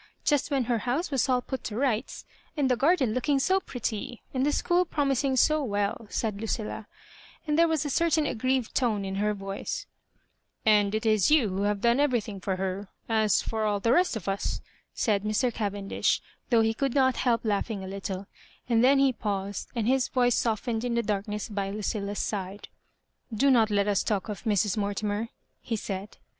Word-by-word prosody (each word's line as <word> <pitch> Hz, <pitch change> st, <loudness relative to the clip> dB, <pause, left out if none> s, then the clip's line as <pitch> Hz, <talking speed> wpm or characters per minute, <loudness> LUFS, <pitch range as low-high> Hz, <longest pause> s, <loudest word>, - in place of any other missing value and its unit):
Just 290 Hz, 0 st, +2 dB
when 275 Hz, -3 st, +1 dB
her 235 Hz, -1 st, 0 dB
house 260 Hz, -, -1 dB
was 270 Hz, 0 st, +1 dB
all 250 Hz, -1 st, +2 dB
put 265 Hz, -, -5 dB
to 210 Hz, -, -4 dB
rights, 245 Hz, -2 st, -1 dB, 0.3 s
and 270 Hz, -3 st, +2 dB
the -, -, +4 dB
garden 275 Hz, -4 st, +2 dB
looking 275 Hz, +4 st, +1 dB
so 375 Hz, +8 st, +2 dB
pretty, 245 Hz, -, -5 dB
and 260 Hz, -1 st, 0 dB
the 295 Hz, -, +2 dB
school 350 Hz, +4 st, +2 dB
pro 305 Hz, -4 st, -1 dB
mising 270 Hz, 0 st, +1 dB
80 305 Hz, +4 st, +4 dB
well," 205 Hz, +2 st, -1 dB
said 210 Hz, -2 st, -2 dB
LucillA; 220 Hz, -1 st, -3 dB, 0.6 s
and 300 Hz, -2 st, 0 dB
there 335 Hz, +1 st, +5 dB
was 320 Hz, -2 st, 0 dB
a -, -, -1 dB
certain 320 Hz, -1 st, +2 dB
aggrieved 255 Hz, -1 st, -1 dB
tone 215 Hz, -6 st, +1 dB
in 190 Hz, -, -4 dB
her 210 Hz, 0 st, +1 dB
voica 195 Hz, 0 st, -5 dB, 0.4 s
" -, -, -47 dB
And 205 Hz, +1 st, -1 dB
it 220 Hz, -, -2 dB
is 215 Hz, -3 st, +3 dB
you 295 Hz, -8 st, +4 dB
who 190 Hz, +1 st, -2 dB
have 205 Hz, -1 st, 0 dB
done 235 Hz, +2 st, +3 dB
everything 240 Hz, -8 st, 0 dB
for 190 Hz, +1 st, -1 dB
her, 190 Hz, +1 st, -3 dB, 0.2 s
as 220 Hz, -2 st, +2 dB
for 220 Hz, -1 st, -2 dB
all 205 Hz, -1 st, +1 dB
the 230 Hz, +4 st, +2 dB
rest 355 Hz, -3 st, +3 dB
of 205 Hz, -5 st, -6 dB
us," 195 Hz, +1 st, -1 dB, 0.4 s
said 210 Hz, -4 st, +1 dB
Mr. 215 Hz, +3 st, +1 dB
Cavendish, 200 Hz, -2 st, -1 dB, 0.3 s
though 235 Hz, -2 st, +5 dB
he 225 Hz, 0 st, +2 dB
could 270 Hz, +3 st, -1 dB
not 260 Hz, -2 st, +3 dB
help 235 Hz, -3 st, +1 dB
laughing 205 Hz, -1 st, -1 dB
a -, -, -6 dB
little; 195 Hz, 0 st, -5 dB, 0.4 s
and 235 Hz, -1 st, +3 dB
then 275 Hz, +2 st, +6 dB
he 270 Hz, -1 st, +4 dB
paused, 200 Hz, -3 st, -3 dB
and 230 Hz, -3 st, 0 dB
bis 260 Hz, +1 st, +2 dB
voice 245 Hz, -1 st, +2 dB
softened 225 Hz, 0 st, -1 dB
in 245 Hz, -1 st, -1 dB
the 235 Hz, -, +1 dB
darkness 210 Hz, 0 st, -2 dB
by 200 Hz, -2 st, -3 dB
Ludlla's 205 Hz, 0 st, -3 dB
side. 195 Hz, -1 st, -4 dB, 0.7 s
^* -, -, -6 dB
Do 275 Hz, +5 st, +4 dB
not 225 Hz, -4 st, +4 dB
let 200 Hz, -1 st, +1 dB
us 200 Hz, -2 st, +2 dB
talk 205 Hz, 0 st, -1 dB
of 200 Hz, -5 st, -6 dB
Mrs. 210 Hz, -1 st, +1 dB
Mortimer," 205 Hz, +2 st, -2 dB, 0.3 s
he 230 Hz, -, -3 dB
said. 200 Hz, -1 st, -5 dB
225 Hz, 200 wpm, -27 LUFS, 205-260 Hz, 0.7 s, then